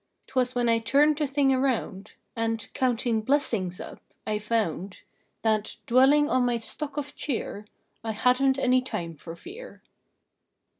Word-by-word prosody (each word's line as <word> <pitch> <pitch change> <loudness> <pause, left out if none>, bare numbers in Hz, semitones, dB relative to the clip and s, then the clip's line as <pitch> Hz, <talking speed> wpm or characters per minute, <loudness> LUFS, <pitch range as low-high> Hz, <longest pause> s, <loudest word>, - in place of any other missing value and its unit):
Twas 255 -1 0
then 245 -1 +1
I 230 0 +3
turned 285 +6 +3
the 300 - +1
thing 270 0 +2
around, 235 -7 -1 0.2
A.nd, 225 -1 -2
counting 240 -3 +1
blessings 220 -8 0
up, - - -9 0.2
I 210 -1 -1
found 205 -4 -2 0.4
That, 215 -1 +1
dwelling 270 +4 +5
on 255 -4 +2
my 245 -1 +1
stock 280 +5 -5
of 290 0 -4
cheer, 225 -6 -3 0.4
I 225 -1 -2
hadn 255 +4 +3
t 270 - -5
any 255 0 +4
time 170 -10 -5
for 165 +3 -9
fear. 435 - -11
245 Hz, 150 wpm, -27 LUFS, 220-275 Hz, 0.4 s, dwelling